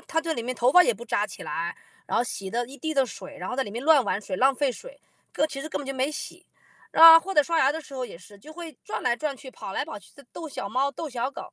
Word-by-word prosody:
她 325 Hz, -, +1 dB
在 325 Hz, -1 st, -2 dB
里 235 Hz, -, -4 dB
面 255 Hz, +2 st, -3 dB
头 250 Hz, +3 st, +2 dB
发 360 Hz, -, +9 dB
也 -, -, +2 dB
不 480 Hz, -, -10 dB
扎 -, -, 0 dB
起 -, -, -9 dB
来， -, -, -3 dB, 0.3 s
然 -, -, -1 dB
后 240 Hz, -, +2 dB
洗 195 Hz, -4 st, -3 dB
得 240 Hz, +2 st, -1 dB
一 270 Hz, +3 st, -11 dB
地 315 Hz, +4 st, -3 dB
的 270 Hz, -1 st, +4 dB
水， 190 Hz, -4 st, -10 dB
然 180 Hz, -, -6 dB
后 -, -, -3 dB
在 270 Hz, -, 0 dB
里 205 Hz, -, -7 dB
面 235 Hz, +4 st, -5 dB
乱 310 Hz, -3 st, +6 dB
玩 -, -, 0 dB
水， 200 Hz, -, -5 dB
浪 265 Hz, +2 st, +4 dB
费 275 Hz, -1 st, 0 dB
水， -, -, -12 dB, 0.3 s
个 310 Hz, -, +1 dB
其 275 Hz, -2 st, -7 dB
实 310 Hz, -, -6 dB
根 -, -, -3 dB
本 285 Hz, -, -7 dB
就 275 Hz, -, -4 dB
没 265 Hz, +3 st, 0 dB
洗。 300 Hz, -, -7 dB, 0.5 s
啊， 330 Hz, 0 st, +10 dB
或 390 Hz, +3 st, -5 dB
者 295 Hz, -, +6 dB
刷 330 Hz, +3 st, -1 dB
牙 270 Hz, -, +4 dB
的 320 Hz, +2 st, -4 dB
时 280 Hz, -3 st, -13 dB
候， 255 Hz, -1 st, -3 dB
也 170 Hz, -, -10 dB
是， 200 Hz, +3 st, -15 dB
就 300 Hz, +10 st, -13 dB
会 325 Hz, -4 st, -9 dB
转 -, -, -4 dB
来 -, -, +1 dB
转 280 Hz, +1 st, -3 dB
去， 260 Hz, -, -12 dB
跑 195 Hz, -6 st, -8 dB
来 -, -, -1 dB
跑 -, -, -8 dB
去， 205 Hz, -, -14 dB
就 280 Hz, -, -15 dB
逗 325 Hz, -, -7 dB
小 200 Hz, -, -5 dB
猫、 265 Hz, +6 st, 0 dB
逗 315 Hz, +3 st, -6 dB
小 250 Hz, 0 st, -3 dB
狗， -, -, -9 dB
275 Hz, 340 characters per minute, -26 LUFS, 245-315 Hz, 0.5 s, 啊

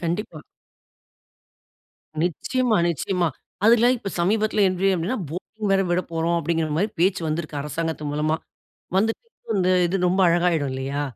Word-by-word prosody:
கண்டிப்பா. 170 Hz, -2 st, -3 dB, 1.8 s
நிச்சயமா, 230 Hz, -, 0 dB
நிச்சயமா. 175 Hz, +1 st, 0 dB, 0.4 s
அதுல 235 Hz, +2 st, +6 dB
இப்போ 205 Hz, -4 st, -6 dB
சமீபத்துல 210 Hz, +3 st, +2 dB
என்ட்றீ 185 Hz, +1 st, +1 dB
அப்டின்னா, 180 Hz, +9 st, -2 dB
போட்டிங் 205 Hz, +5 st, -5 dB
வேற 195 Hz, 0 st, +3 dB
விடப்போறோம். 170 Hz, -1 st, 0 dB
அப்டின்கிற 165 Hz, 0 st, -1 dB
மாரி 205 Hz, +5 st, +1 dB
பேச்சு 185 Hz, 0 st, +2 dB
வந்து 155 Hz, +1 st, -2 dB, 0.2 s
அரசாங்கத்தின் 150 Hz, 0 st, -3 dB
மூலமா. 155 Hz, +2 st, 0 dB, 0.6 s
வந்துட்டு 220 Hz, -, -1 dB, 0.2 s
இது 185 Hz, -, -2 dB
ரொம்ப 185 Hz, +2 st, +2 dB
அழகாயுடும் 170 Hz, -5 st, +2 dB
இல்லயா? 135 Hz, +2 st, -3 dB
175 Hz, 120 wpm, -23 LUFS, 165-205 Hz, 1.8 s, அதுல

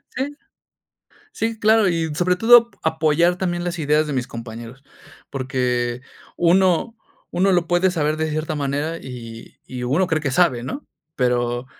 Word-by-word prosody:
Sí. 275 Hz, +3 st, -3 dB, 1.0 s
Sí, 225 Hz, 0 st, -3 dB
claro. 220 Hz, -1 st, +4 dB
Y 165 Hz, -3 st, -1 dB
sobre 180 Hz, +2 st, +1 dB
todo 235 Hz, +4 st, +6 dB
a 160 Hz, -, +3 dB
apoyar 160 Hz, +2 st, +2 dB
también 175 Hz, -2 st, -2 dB
las 175 Hz, -1 st, -3 dB
ideas 150 Hz, 0 st, +2 dB
de 150 Hz, -, -3 dB
mis 130 Hz, -1 st, -2 dB
compañeros. 115 Hz, +2 st, -9 dB, 0.5 s
Porque 125 Hz, -2 st, -2 dB, 0.3 s
uno 185 Hz, +5 st, +2 dB, 0.4 s
uno 190 Hz, +2 st, +2 dB
lo 175 Hz, -2 st, +2 dB
puede 175 Hz, +2 st, +2 dB
saber 155 Hz, -3 st, 0 dB
de 160 Hz, 0 st, -1 dB
cierta 155 Hz, +1 st, -3 dB
manera 145 Hz, +3 st, -2 dB
y 115 Hz, -5 st, -10 dB
y 125 Hz, -1 st, -6 dB
uno 150 Hz, +10 st, +1 dB
cree 160 Hz, -3 st, 0 dB
que 140 Hz, -3 st, -2 dB
sabe, 130 Hz, -6 st, +2 dB
¿no? 275 Hz, -, -6 dB, 0.3 s
Pero 120 Hz, -1 st, 0 dB
155 Hz, 160 wpm, -21 LUFS, 130-180 Hz, 1.0 s, todo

